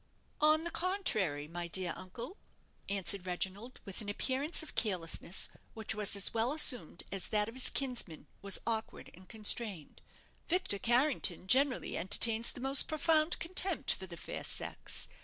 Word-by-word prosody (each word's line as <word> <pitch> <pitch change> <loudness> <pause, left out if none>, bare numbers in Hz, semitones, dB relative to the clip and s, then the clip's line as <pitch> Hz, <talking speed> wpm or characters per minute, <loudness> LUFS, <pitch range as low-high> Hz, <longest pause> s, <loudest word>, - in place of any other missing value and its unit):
"On 310 +1 +5
the 340 - -4
contrary, 215 - -1
my 170 +2 -5
dear 180 0 -3
uncle," 235 - -8 0.5
answered 195 -1 0
Reginald, 190 +7 -3
with 195 +3 -6
an 205 - -6
appearance 270 +10 0
of 315 - -10
carelessness 180 -4 +2 0.3
which 220 -1 -2
was 210 -1 0
as 200 - +2
well 230 +4 +1
assumed 245 - +1
as 195 -2 -1
that 210 -1 +1
of 225 - -7
his 260 0 +4
kinsman 245 - -3 0.2
was 200 -1 +4
awkward 225 -1 -3
and 185 +1 -16
constrained; 215 -6 -2 0.5
"Victor 340 - 0
Carrington 240 - +1
generally 260 +6 +3
entertains 225 +5 +3
the - - -9
most 270 +1 +3
profound 310 +1 +2
contempt 365 +1 -1
for 190 - -7
the 170 -1 -9
fair - - -6
sex. - - -1
220 Hz, 155 wpm, -33 LUFS, 190-275 Hz, 0.5 s, On